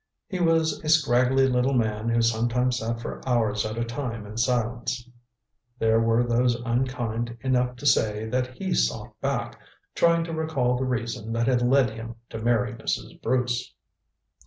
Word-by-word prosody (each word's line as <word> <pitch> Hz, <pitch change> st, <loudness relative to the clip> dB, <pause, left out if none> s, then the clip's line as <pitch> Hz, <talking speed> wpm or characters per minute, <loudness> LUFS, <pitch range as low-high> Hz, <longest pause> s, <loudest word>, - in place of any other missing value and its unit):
He 190 Hz, -4 st, -4 dB
was 165 Hz, -2 st, +2 dB
a 155 Hz, -, -2 dB
scraggly 135 Hz, -3 st, +4 dB
little 130 Hz, +1 st, +1 dB
man 110 Hz, -1 st, 0 dB
who 115 Hz, 0 st, +2 dB
sometimes 120 Hz, +2 st, +1 dB
sat 115 Hz, +1 st, -3 dB
for 115 Hz, -, -6 dB
hours 110 Hz, -3 st, +1 dB
at 110 Hz, +1 st, -6 dB
a 115 Hz, -, -1 dB
time 115 Hz, -2 st, -4 dB
in 105 Hz, +1 st, -9 dB
silence. 120 Hz, 0 st, -1 dB, 0.7 s
There 110 Hz, -1 st, +3 dB
were 115 Hz, +1 st, +3 dB
those 120 Hz, 0 st, +2 dB
unkind 120 Hz, -1 st, -2 dB
enough 125 Hz, -1 st, +1 dB
to 125 Hz, -, -10 dB
say 110 Hz, -5 st, +2 dB
that 125 Hz, +2 st, -2 dB
he 190 Hz, -2 st, -2 dB
sought -, -, 0 dB
back, -, -, -2 dB, 0.3 s
trying 170 Hz, 0 st, +3 dB
to 165 Hz, 0 st, -5 dB
recall 155 Hz, -6 st, 0 dB
the 130 Hz, +1 st, -1 dB
reason 115 Hz, -3 st, -3 dB
that 115 Hz, 0 st, +1 dB
had 125 Hz, -1 st, +2 dB
led 125 Hz, -1 st, +3 dB
him 115 Hz, +1 st, -8 dB, 0.2 s
to 110 Hz, -, -5 dB
marry 120 Hz, +2 st, +1 dB
Mrs. 115 Hz, -, -4 dB
Bruce. 125 Hz, -1 st, -1 dB
120 Hz, 165 wpm, -25 LUFS, 115-130 Hz, 0.7 s, scraggly